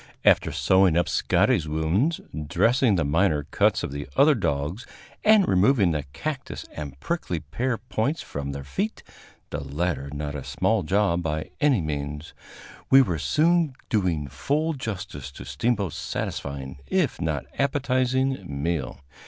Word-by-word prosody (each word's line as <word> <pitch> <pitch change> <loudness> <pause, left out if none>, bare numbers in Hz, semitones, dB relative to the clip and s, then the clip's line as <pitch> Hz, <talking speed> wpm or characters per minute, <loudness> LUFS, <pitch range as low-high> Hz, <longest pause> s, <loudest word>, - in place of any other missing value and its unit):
After - - +5
sewing 95 -3 +3
up 85 - +2
Scotty's 80 - +2
wounds, 80 - +1 0.3
dressing 115 - +3
the 85 -4 +1
minor 75 0 +2
cuts - - +1
of - - -3
the 70 0 -5
other 150 +2 +6
dogs 80 - -2 0.4
and 215 -3 +6
removing 100 0 +4
the 75 -3 -2
cactus 135 - -5
and 70 -3 -7
prickly 125 - -2
pear 125 +5 -2
points 125 +6 -2
from 70 0 -5
their 70 0 -6
feet 200 - -3 0.5
(the - - -3
latter 70 0 -2
not 75 0 -4
a 70 -3 -5
small 110 -2 +1
job 95 0 +1
by 80 -2 -3
any 140 -9 +3
means), 75 +1 -4 0.6
we 135 0 +8
were 85 -9 -2
soon 160 - +2 0.2
doing 90 - +1
full 145 - -1
justice 95 - -6
to 60 - -9
Steamboat's 100 - -1
satisfying 70 -1 -4
if - - 0
not 75 -4 -1
appetizing 130 -3 +1
meal. 70 -2 -2
90 Hz, 145 wpm, -25 LUFS, -, 0.6 s, we